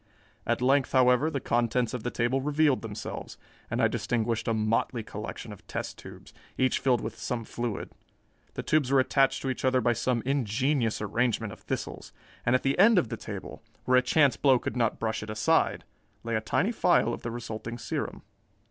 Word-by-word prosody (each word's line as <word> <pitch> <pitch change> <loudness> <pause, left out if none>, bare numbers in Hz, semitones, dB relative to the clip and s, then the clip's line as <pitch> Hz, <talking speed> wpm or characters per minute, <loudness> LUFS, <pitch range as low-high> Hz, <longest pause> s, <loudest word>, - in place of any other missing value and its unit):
At - - 0
length, 135 +1 +3
however, 130 +3 +4
the 145 -4 -2
contents 120 +1 0
of 125 - -3
the 120 - -2
table 120 +3 0
revealed 150 -1 +2
themselves, 110 -2 -6 0.3
and - - -2
I - - +6
distinguished 115 -1 -1
a 115 - +2
motley 110 +2 0
collection 105 +1 -7
of 100 - -16
test - - -5
tubes, - - -12 0.2
each 130 0 +2
filled 125 -4 +2
with 110 +1 -6
some 120 -2 -3
fluid. 120 -1 -4 0.6
The - - -4
tubes 150 -4 +2
were 135 - +5
attached 135 +1 +2
to 135 - -1
each - - -6
other 130 0 +3
by 120 0 +2
some 115 +1 -1
ingenious 130 -2 0
arrangement 110 0 0
of - - -13
thistles, - - -5 0.3
and 125 - +4
at 130 - +1
the 135 +5 0
end 215 +2 +7
of 130 -11 +2
the 115 - -3
table, - - -8 0.2
where 130 0 +4
a - - +6
chance 140 +2 +3
blow 135 -3 +5
could - - -4
not 115 -3 +1
brush 110 -1 -2
it 105 - -7
aside, 110 0 +1 0.4
lay 115 0 -3
a 110 - 0
tiny 185 - +1
phial 175 - +3
of - - -6
the 120 - -4
resulting 115 0 -6
serum. 115 - -4
120 Hz, 195 wpm, -28 LUFS, 115-135 Hz, 0.6 s, end